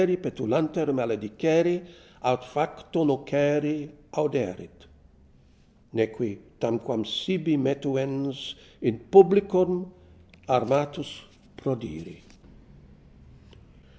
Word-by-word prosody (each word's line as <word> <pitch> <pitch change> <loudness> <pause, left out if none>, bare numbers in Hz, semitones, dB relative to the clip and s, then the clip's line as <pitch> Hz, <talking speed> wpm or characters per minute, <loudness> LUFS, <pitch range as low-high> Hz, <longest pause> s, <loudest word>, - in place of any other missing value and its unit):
petulanter 155 -3 -1
maledicere, 135 - +1 0.4
Aut 125 0 +1
facto 150 +5 -2
nocere 145 +1 +1 0.2
auderet; 140 -11 -3 1.1
Neque, 110 -1 -2 0.2
tanquam 115 -1 -2
sibi 160 - 0
metuens, 135 0 -2 0.3
In 115 -2 0
publicum 190 -2 +6 0.6
armatus 135 +4 +1 0.5
prodire. 115 - -6
140 Hz, 60 wpm, -26 LUFS, 120-160 Hz, 1.1 s, publicum